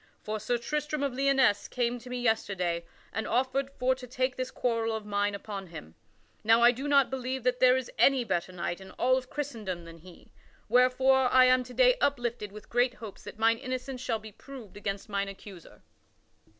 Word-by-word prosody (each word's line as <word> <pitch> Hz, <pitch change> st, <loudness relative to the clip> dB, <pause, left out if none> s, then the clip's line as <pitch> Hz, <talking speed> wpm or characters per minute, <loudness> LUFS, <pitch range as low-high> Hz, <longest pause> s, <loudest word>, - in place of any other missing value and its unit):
For 215 Hz, 0 st, -3 dB
Sir 225 Hz, +3 st, 0 dB
Tristram 295 Hz, +4 st, -2 dB
of 275 Hz, -3 st, -1 dB
Lyonesse 270 Hz, -5 st, +2 dB
came 245 Hz, -1 st, -1 dB
to 250 Hz, +2 st, -12 dB
me 250 Hz, 0 st, -3 dB
yesterday, 190 Hz, -7 st, 0 dB, 0.3 s
and 220 Hz, -, -2 dB
offered 265 Hz, +3 st, 0 dB
for 255 Hz, +1 st, +2 dB
to 255 Hz, -1 st, -9 dB
take 255 Hz, +1 st, -1 dB
this 255 Hz, 0 st, -3 dB
quarrel 230 Hz, -2 st, -1 dB
of 220 Hz, -1 st, -6 dB
mine 205 Hz, 0 st, 0 dB
upon 200 Hz, -1 st, -7 dB
him. 80 Hz, -, -10 dB, 0.5 s
Now 225 Hz, +2 st, +5 dB
I 240 Hz, -, +8 dB
do 265 Hz, +4 st, -5 dB
not 280 Hz, -2 st, +4 dB
believe 260 Hz, -1 st, -3 dB
that 250 Hz, 0 st, +1 dB
there 255 Hz, 0 st, +6 dB
is 260 Hz, -2 st, -4 dB
any 270 Hz, -2 st, +5 dB
better 185 Hz, -4 st, -2 dB
knight 175 Hz, 0 st, -4 dB
in 190 Hz, -, -11 dB
all 255 Hz, +1 st, +2 dB
of 255 Hz, -1 st, -3 dB
Christendom 220 Hz, -, -5 dB
than 165 Hz, 0 st, -12 dB
he, 175 Hz, +1 st, -16 dB, 0.4 s
wherefore 255 Hz, +2 st, +4 dB
I 255 Hz, 0 st, +7 dB
am 255 Hz, 0 st, +4 dB
to 250 Hz, -, -11 dB
day -, -, +5 dB
uplifted 240 Hz, -6 st, -1 dB
with 210 Hz, +1 st, -11 dB
great 245 Hz, +1 st, +1 dB
hopes 220 Hz, -5 st, -10 dB
that -, -, -9 dB
mine 225 Hz, +1 st, +3 dB
innocence 255 Hz, 0 st, -5 dB
shall 230 Hz, -3 st, -1 dB
be 215 Hz, 0 st, -11 dB
proved 240 Hz, -1 st, -12 dB
against 200 Hz, -1 st, -4 dB
mine 200 Hz, -1 st, -1 dB
accuser." 195 Hz, -3 st, -12 dB
245 Hz, 200 wpm, -29 LUFS, 205-260 Hz, 0.5 s, I